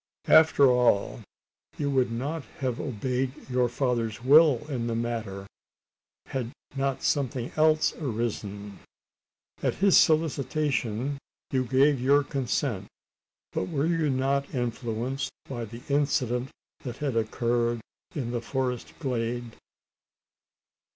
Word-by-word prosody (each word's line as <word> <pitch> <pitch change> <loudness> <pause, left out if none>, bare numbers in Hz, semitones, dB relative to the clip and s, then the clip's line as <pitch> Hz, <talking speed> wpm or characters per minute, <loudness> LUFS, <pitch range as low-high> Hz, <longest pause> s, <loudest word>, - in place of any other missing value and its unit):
"After 160 -2 +7
all, 125 -5 +2 0.6
you 145 -1 -1
would 130 -3 +2
not 140 +7 -3 0.2
have 125 -3 -1
obeyed 130 +2 -3
your 125 -1 +1
father's 120 -3 -1
will 145 -1 +6
in 125 -5 -2
the 115 - -1
matter, 115 -4 -3 0.8
had 125 -4 -4 0.2
not 135 -1 -1
something 130 -4 0
else 155 0 +3
arisen. 105 -6 -4 0.8
At - - 0
his 195 -1 +4
solicitation, 140 -5 +1 0.3
you 130 -1 +1
gave 135 +2 +3
your 140 +3 +4
consent; 125 -6 -2 0.6
but - - -1
were 145 0 0
you 165 -2 +1
not 135 +1 0
influenced 120 +2 -2 0.2
by 120 -3 -4
the 115 +3 -10
incident 135 -3 +1 0.3
that 125 -3 -7
had 140 -5 -2
occurred 115 +1 0 0.4
in 125 -6 -2
the 120 -1 -2
forest 125 0 -3
glade?" 120 -4 -3
125 Hz, 115 wpm, -27 LUFS, 115-140 Hz, 0.8 s, After